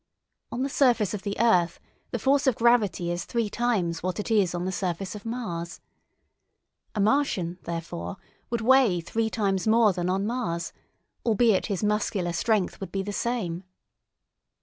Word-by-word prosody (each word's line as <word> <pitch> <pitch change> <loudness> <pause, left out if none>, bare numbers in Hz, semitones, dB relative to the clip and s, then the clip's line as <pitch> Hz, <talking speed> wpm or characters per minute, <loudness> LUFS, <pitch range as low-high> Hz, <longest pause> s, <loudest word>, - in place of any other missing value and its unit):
On 250 - -2
the - - 0
surface 245 -8 +2
of 205 - -3
the 200 0 -4
earth 180 -7 +3 0.3
the - - -2
force 280 +1 +2
of 260 - +4
gravity 210 -8 +2
is 175 +1 -2
three 230 -3 -2
times 205 -10 0
what 185 +3 -2
it 210 - -3
is 195 -5 +3
on 175 +1 -2
the 190 - -1
surface 185 0 -3
of 210 +1 -8
Mars. 175 -8 -4 1.2
A - - -1
Martian, 200 -7 +1
therefore, 165 - -5 0.3
would 235 -1 -1
weigh 245 -6 +4
three 220 +7 -1
times 195 -3 0
more 220 -2 +5
than 175 0 -2
on 195 +2 0
Mars, 210 -8 -2 0.5
albeit 225 -3 +3
his 200 -1 -2
muscular 210 -4 0
strength 210 +1 0
would 195 - -6
be 195 0 -2
the 205 +1 -5
same. 195 -7 -2
205 Hz, 165 wpm, -26 LUFS, 175-235 Hz, 1.2 s, more